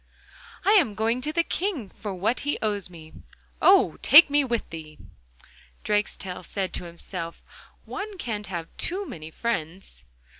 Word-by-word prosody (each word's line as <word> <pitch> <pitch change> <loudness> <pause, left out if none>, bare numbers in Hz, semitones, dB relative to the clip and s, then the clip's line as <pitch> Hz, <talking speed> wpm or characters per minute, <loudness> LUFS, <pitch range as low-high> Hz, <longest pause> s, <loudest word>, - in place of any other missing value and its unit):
'I 400 - +5
am 225 - 0
going 225 +4 0
to 300 - -2
the 335 +2 +2
King 340 - -2
for 205 +1 -7
what 210 +7 0
he 290 +1 -1
owes 205 -4 -1
me.' 160 -3 -13 0.5
'Oh! 385 +1 +5
take 300 +1 +8
me 290 0 +4
with 235 -4 -2
thee!' 155 -2 -9 0.9
Drakestail 205 -3 -1
said 190 +1 -3
to 180 - -4
himself: 170 0 -7 0.4
'One 410 0 -6
can't 215 - -4
have 170 -3 -6
too 390 +3 -1
many 160 - -8
friends. 170 - -4
210 Hz, 150 wpm, -26 LUFS, 175-290 Hz, 0.9 s, take